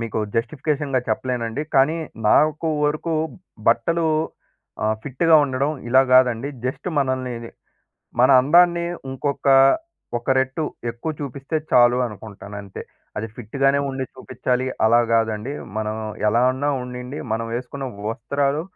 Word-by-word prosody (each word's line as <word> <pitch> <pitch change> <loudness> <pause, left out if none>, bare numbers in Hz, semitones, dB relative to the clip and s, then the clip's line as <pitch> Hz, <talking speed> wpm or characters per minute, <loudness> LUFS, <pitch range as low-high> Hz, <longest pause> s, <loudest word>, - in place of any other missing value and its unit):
మీకు 115 -1 -3 0.2
జస్టిఫికేషన్‌గా 140 +2 -1
చెప్పలేనండి. 120 +3 -2
కానీ 140 +5 +4 0.3
నాకు 155 +4 +3 0.2
వరకు 155 +3 -1 0.6
బట్టలు 160 +9 +2 0.8
ఆహ్, 110 0 +1
ఫిట్‌గా 160 +4 +2
ఉండడం 135 +2 -1 0.2
ఇలా 130 +2 +6
గాదండి. 130 0 +4 0.2
జస్ట్ 130 +7 -3
మనల్ని 130 -2 -1 0.9
మన 130 - +6
అందాన్ని 170 +4 +4 0.3
ఇంకొక 140 +2 -3 0.7
ఒక 120 - -15
రెట్టు 135 +4 0 0.3
ఎక్కువ 120 +7 -5
చూపిస్తే 140 +3 -4
చాలు 120 0 +5
అనుకుంటాను 105 -1 -9
అంతే. 100 -1 -8 0.4
అది 110 - -3
ఫిట్‌గానే 135 +4 +1
ఉండి 135 -1 -3
చూపించాలి, 130 0 -2 0.2
అలా 115 +2 +5
గాదండి. 115 +3 0 0.3
మనం 110 0 -2 0.3
ఎలా 115 +3 +3
ఉన్నా 145 +3 -1
ఉండనియండి, 125 +2 -6
మనం 115 0 -3
వేసుకున్న 130 +2 -5 0.2
వస్త్రాలు 140 +5 -1
130 Hz, 120 wpm, -22 LUFS, 115-145 Hz, 0.9 s, ఇలా